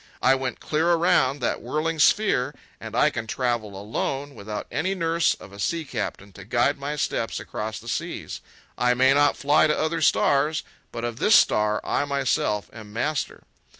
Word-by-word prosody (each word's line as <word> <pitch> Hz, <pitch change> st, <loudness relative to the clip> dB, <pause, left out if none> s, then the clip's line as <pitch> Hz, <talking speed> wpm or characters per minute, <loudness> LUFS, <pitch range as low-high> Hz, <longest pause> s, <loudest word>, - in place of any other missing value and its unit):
I 130 Hz, -, +6 dB
went 130 Hz, -1 st, -3 dB
clear 160 Hz, +3 st, +1 dB
around 165 Hz, -6 st, +2 dB
that 120 Hz, -, -1 dB
whirling 155 Hz, +6 st, -2 dB
sphere, 200 Hz, -6 st, +3 dB, 0.2 s
and -, -, -8 dB
I -, -, +4 dB
can 115 Hz, -, -5 dB
travel 115 Hz, -6 st, -2 dB
alone, 135 Hz, +7 st, -3 dB
without 105 Hz, -2 st, -6 dB
any 190 Hz, +1 st, -1 dB
nurse 165 Hz, -1 st, +1 dB
of 100 Hz, -, -14 dB
a 100 Hz, -, -11 dB
sea 165 Hz, +10 st, -1 dB
captain 100 Hz, -5 st, -5 dB
to 100 Hz, -, -11 dB
guide 120 Hz, +7 st, +1 dB
my 145 Hz, +2 st, -3 dB
steps 115 Hz, -5 st, -2 dB
across 110 Hz, 0 st, -5 dB
the 115 Hz, -, -11 dB
seas. -, -, -4 dB, 0.4 s
I 125 Hz, 0 st, +3 dB
may 130 Hz, +2 st, +5 dB
not 145 Hz, 0 st, +3 dB
fly 145 Hz, +2 st, +4 dB
to 150 Hz, -, +1 dB
other 160 Hz, +1 st, -1 dB
stars, 150 Hz, -1 st, +2 dB, 0.3 s
but 115 Hz, -, -6 dB
of 120 Hz, -1 st, -4 dB
this 210 Hz, -, +4 dB
star 105 Hz, 0 st, +3 dB
I 145 Hz, -, 0 dB
myself 135 Hz, -7 st, 0 dB
am 110 Hz, -2 st, -11 dB
master." 145 Hz, +7 st, -2 dB
135 Hz, 180 wpm, -24 LUFS, 110-155 Hz, 0.4 s, I